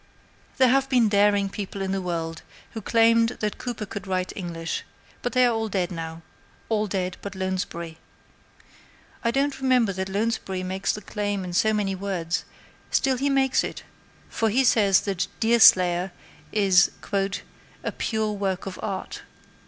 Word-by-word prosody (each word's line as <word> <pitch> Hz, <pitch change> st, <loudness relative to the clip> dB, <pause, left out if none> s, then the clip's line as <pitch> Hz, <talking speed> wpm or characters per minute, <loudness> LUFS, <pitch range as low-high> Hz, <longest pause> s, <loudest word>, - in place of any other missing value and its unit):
There 260 Hz, -1 st, +5 dB
have 270 Hz, +1 st, +2 dB
been 245 Hz, -5 st, +4 dB
daring 205 Hz, -1 st, +3 dB
people 200 Hz, 0 st, -6 dB
in 190 Hz, -1 st, -2 dB
the 195 Hz, 0 st, -1 dB
world 165 Hz, -2 st, -3 dB, 0.3 s
who 225 Hz, -, -6 dB
claimed 230 Hz, +2 st, +3 dB
that 210 Hz, -1 st, -2 dB
Cooper 240 Hz, -3 st, -4 dB
could 200 Hz, -1 st, -7 dB
write 185 Hz, -1 st, -1 dB
English, 170 Hz, -3 st, -4 dB, 0.4 s
but 245 Hz, -, -3 dB
they 255 Hz, 0 st, +5 dB
are 240 Hz, -, +3 dB
all 225 Hz, -1 st, -2 dB
dead 185 Hz, -3 st, -1 dB
now 165 Hz, -1 st, -6 dB, 0.5 s
all 215 Hz, -1 st, +1 dB
dead 185 Hz, -2 st, -2 dB
but 200 Hz, -1 st, -7 dB
Lounsbury. 185 Hz, -3 st, -4 dB, 1.2 s
I 235 Hz, -, +2 dB
don't 275 Hz, +3 st, 0 dB
remember 250 Hz, -6 st, +3 dB
that 190 Hz, +1 st, -3 dB
Lounsbury 195 Hz, -2 st, -1 dB
makes 190 Hz, +1 st, -1 dB
the 210 Hz, -, -5 dB
claim 205 Hz, -2 st, -2 dB
in 180 Hz, -1 st, -6 dB
so 220 Hz, +5 st, +3 dB
many 205 Hz, -2 st, 0 dB
words, 185 Hz, -3 st, -2 dB, 0.4 s
still 265 Hz, -1 st, +2 dB
he 280 Hz, +3 st, 0 dB
makes 270 Hz, -1 st, +2 dB
it, -, -, -6 dB, 0.4 s
for 225 Hz, -, 0 dB
he 255 Hz, +6 st, +3 dB
says 205 Hz, -6 st, +4 dB
that 190 Hz, -2 st, -2 dB
Deerslayer 185 Hz, -6 st, +5 dB, 0.4 s
is 195 Hz, -3 st, +4 dB, 0.9 s
a -, -, -2 dB
"pure 220 Hz, -2 st, -1 dB
work 195 Hz, -3 st, -2 dB
of 195 Hz, -1 st, -6 dB
art." 195 Hz, -3 st, -4 dB
200 Hz, 160 wpm, -25 LUFS, 185-225 Hz, 1.2 s, There